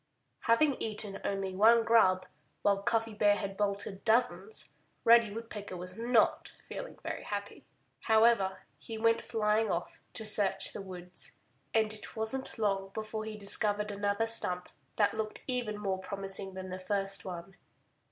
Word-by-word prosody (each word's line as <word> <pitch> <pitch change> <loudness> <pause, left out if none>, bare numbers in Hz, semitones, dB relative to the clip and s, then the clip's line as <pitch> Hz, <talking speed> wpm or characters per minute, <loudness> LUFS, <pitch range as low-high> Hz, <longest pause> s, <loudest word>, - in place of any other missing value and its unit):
Having 270 +5 +3
eaten 210 -2 -3
only 195 -1 -2
one 225 +4 +6
grub, 190 -5 +4 0.4
while 200 -1 +3
Cuffy 225 +2 0
Bear 205 -1 +4
had 195 -1 -4
bolted 200 -1 -2
dozens, 220 -7 +1 0.3
Reddy 230 -2 +6
Woodpecker 210 -3 -7
was 180 +1 -7
not 230 0 +2
feeling - - -7
very - - -4
happy. - - -6 0.3
However, 220 -4 +3 0.2
he 225 - -7
went 230 +1 +3
flying 215 0 +1
off 175 -1 -3
to 220 - -6
search 200 -2 +1
the - - -6
woods. 180 -2 -8 0.4
And 220 -1 +2
it 215 - -6
wasn't 225 +5 -3
long 195 -3 0
before 215 0 -4
he 215 -1 -6
discovered 210 +1 +4
another 205 +2 0
stump 180 -6 +1 0.3
that 205 -2 +3
looked 220 -1 -4
even 245 -5 -1
more 195 -2 -2
promising 195 0 -4
than 185 -1 -6
the 185 - -5
first 195 +1 -2
one. 185 +1 -7
210 Hz, 150 wpm, -31 LUFS, 195-225 Hz, 0.4 s, one